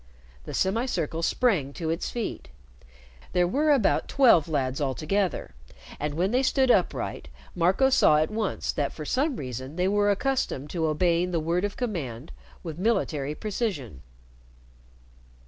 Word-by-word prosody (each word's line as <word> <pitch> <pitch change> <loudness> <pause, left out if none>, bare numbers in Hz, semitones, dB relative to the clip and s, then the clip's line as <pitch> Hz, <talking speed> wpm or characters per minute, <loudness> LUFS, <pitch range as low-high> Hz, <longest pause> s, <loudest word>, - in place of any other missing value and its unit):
The - - -6
semicircle 190 - -1
sprang 170 - +1
to 160 0 -3
its 165 - -2
feet. 235 -3 -5 0.8
There 180 -1 +3
were 295 - +1
about 210 - +3
twelve 230 - +5
lads 135 -3 -1
altogether, 155 - -1 0.5
and, 150 0 -3
when 180 +5 +1
they 250 +2 +3
stood 265 -1 +3
upright, - - 0 0.3
Marco 190 +10 +3
saw 155 -11 +5
at 155 +4 +1
once 215 -2 -2
that 145 -2 -2
for 155 - -8
some 275 - 0
reason 130 - -6
they 180 +1 +1
were 205 +1 +2
accustomed 200 - -1
to 165 -3 0
obeying 170 +3 +1
the 170 -2 0
word 170 +3 0
of 205 0 -3
command 160 - -4 0.3
with 165 -2 -6
military 160 -9 0
precision. 185 - -4
175 Hz, 145 wpm, -26 LUFS, 150-215 Hz, 0.8 s, twelve